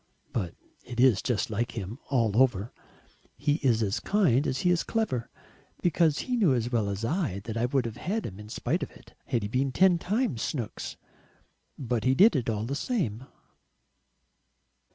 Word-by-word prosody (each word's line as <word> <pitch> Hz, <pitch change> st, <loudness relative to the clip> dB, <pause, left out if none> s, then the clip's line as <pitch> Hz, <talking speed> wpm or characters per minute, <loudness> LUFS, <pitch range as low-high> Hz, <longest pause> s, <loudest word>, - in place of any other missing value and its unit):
But 95 Hz, -8 st, -2 dB, 0.3 s
it 120 Hz, -, -7 dB
is 125 Hz, -6 st, +5 dB
just 120 Hz, -3 st, -1 dB
like 115 Hz, +3 st, -1 dB
him 110 Hz, +3 st, -5 dB
all 115 Hz, -6 st, +2 dB
over; 115 Hz, -4 st, +1 dB, 0.6 s
he 145 Hz, 0 st, +1 dB
is 115 Hz, -5 st, +3 dB
as 105 Hz, +2 st, 0 dB
kind 155 Hz, -, +2 dB
as 130 Hz, -, -1 dB
he 180 Hz, -, +3 dB
is 175 Hz, -, +2 dB
clever. 215 Hz, -, -1 dB, 0.5 s
Because 165 Hz, -3 st, +3 dB
he 255 Hz, -, 0 dB
knew 190 Hz, -, +4 dB
as 120 Hz, 0 st, -1 dB
well 110 Hz, -4 st, +1 dB
as 100 Hz, +3 st, -3 dB
I 150 Hz, -, 0 dB
did 100 Hz, -, -7 dB
that 115 Hz, +1 st, -5 dB
I 115 Hz, -, +2 dB
would 130 Hz, -1 st, +1 dB
have 115 Hz, 0 st, -5 dB
had 210 Hz, -, -2 dB
him 95 Hz, +1 st, -7 dB
in 105 Hz, 0 st, -10 dB
spite -, -, -1 dB
of -, -, -3 dB
it, -, -, -18 dB
had 115 Hz, -3 st, -1 dB
he -, -, -1 dB
been 130 Hz, +5 st, 0 dB
ten 180 Hz, +4 st, +4 dB
times 200 Hz, -, -1 dB
Snooks. 120 Hz, -8 st, -4 dB, 0.8 s
But 120 Hz, -4 st, -2 dB
he 130 Hz, +1 st, +3 dB
did 205 Hz, +5 st, +6 dB
it 125 Hz, -4 st, 0 dB
all 110 Hz, -1 st, -1 dB
the 135 Hz, -, -3 dB
same." 140 Hz, -, -2 dB
125 Hz, 190 wpm, -28 LUFS, 110-160 Hz, 0.8 s, did